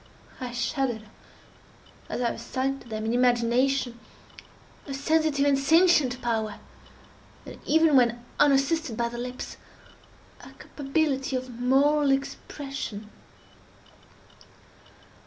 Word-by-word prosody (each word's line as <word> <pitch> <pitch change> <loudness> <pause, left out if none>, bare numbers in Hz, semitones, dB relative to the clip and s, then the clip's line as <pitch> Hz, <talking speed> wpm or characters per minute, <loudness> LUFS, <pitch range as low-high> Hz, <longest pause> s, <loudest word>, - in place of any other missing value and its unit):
I 250 -1 -5
shuddered 240 -1 -2 1.1
as - - -3
I 240 - +2
assigned 270 +3 -3
to - - -15
them 215 0 -4
in 225 - 0
imagination 245 +1 +2 0.9
a 275 - -4
sensitive 300 0 +1
and 280 -1 +3
sentient 305 -4 +4
power, 220 -3 -1 0.9
and - - -10
even 320 -1 +4
when 240 -2 +3
unassisted 280 -2 +2
by 235 -1 0
the 240 0 -7
lips, 250 +1 -6 0.8
a - - -13
capability 275 -2 -2
of 255 0 -4
moral 275 +5 +2
expression. 270 -5 -4
265 Hz, 100 wpm, -26 LUFS, 240-280 Hz, 1.1 s, sentient